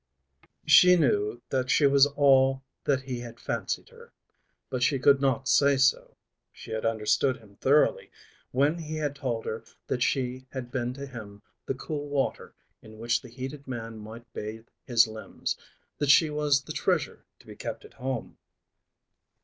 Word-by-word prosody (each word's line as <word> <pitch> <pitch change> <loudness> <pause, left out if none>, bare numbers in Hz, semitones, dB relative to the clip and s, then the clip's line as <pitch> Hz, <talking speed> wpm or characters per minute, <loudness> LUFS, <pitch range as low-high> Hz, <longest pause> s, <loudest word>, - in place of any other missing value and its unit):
She 180 0 +8
knew 120 -7 +1
that 130 -1 0
she 145 - +4
was 140 0 +6
all 135 -2 +3 0.2
that 135 -2 +1
he 130 -2 -4
had 120 -1 -9
fancied - - -3
her, 470 0 -16 0.6
but 130 - -2
she 135 +3 +3
could 140 +1 +4
not 135 -1 +1
say 140 +1 +4
so. 130 0 +1 0.3
She - - -12
had 110 0 -1
understood 115 +4 +1
him 100 -3 -19
thoroughly 145 +3 +2 0.4
when 145 +6 +1
he 155 -1 -5
had 150 -2 -2
told 120 -5 -3
her 110 - -4 0.2
that 125 - -2
she 130 0 -1
had 125 -2 -6
been 125 -2 -2
to 140 0 -6
him 105 -6 -10 0.2
the 135 - -1
cool 145 +2 -5
water 140 -1 -2 0.3
in 110 0 -14
which 120 +2 0
the 125 - -12
heated 135 +4 -7
man 115 -3 -6
might 110 +3 -10
bathe 110 +2 -6 0.2
his 115 -2 +5
limbs; 110 0 -5 0.4
that 145 - 0
she 155 +2 +6
was 150 -2 +2
the - - -7
treasure - - -1
to - - -21
be - - -11
kept - - -6
at - - -15
home. 130 -1 -5
130 Hz, 170 wpm, -27 LUFS, 115-140 Hz, 0.6 s, She